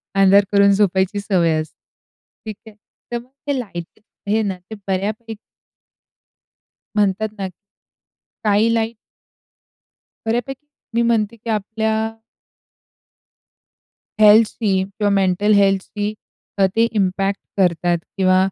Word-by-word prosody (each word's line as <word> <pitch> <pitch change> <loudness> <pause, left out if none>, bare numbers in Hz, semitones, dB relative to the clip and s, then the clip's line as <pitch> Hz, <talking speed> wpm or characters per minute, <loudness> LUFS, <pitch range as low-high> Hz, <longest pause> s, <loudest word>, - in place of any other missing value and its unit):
अंधार 195 +1 +6
करून 200 0 +5
झोपायची 195 0 +1
सवय 180 -5 +1
असते, 155 - -11 0.7
ठीक 215 -1 -5
आहे, 215 - -13 0.4
तर 240 - -1
मग 240 +2 -11 0.2
हे 285 -2 0
लाईट 175 -6 -8 0.3
आहे 215 +2 +2
ना 195 -2 -2 0.2
ते - - -4
बऱ्यापैकी 215 +4 -2 1.6
म्हणतात 210 +1 +1
ना, 195 - -3
स्कायलाईट 220 +3 -3 1.3
बऱ्यापैकी 245 +5 -2 0.3
मी 235 - +3
म्हणते 230 -1 +1
की 230 +1 -9
आपल्या. 220 +1 -1 2.3
हेल्थशी 215 0 +5
किंवा 200 +2 -2
मेंटल 195 +2 +2
हेल्थशी 200 +1 +1 0.5
अ, 195 - +6
ते 225 - +4 0.2
इम्पॅक्ट 195 +1 0 0.2
करतात 175 -2 +2 0.2
किंवा 185 -1 +4
205 Hz, 105 wpm, -20 LUFS, 195-220 Hz, 2.3 s, अंधार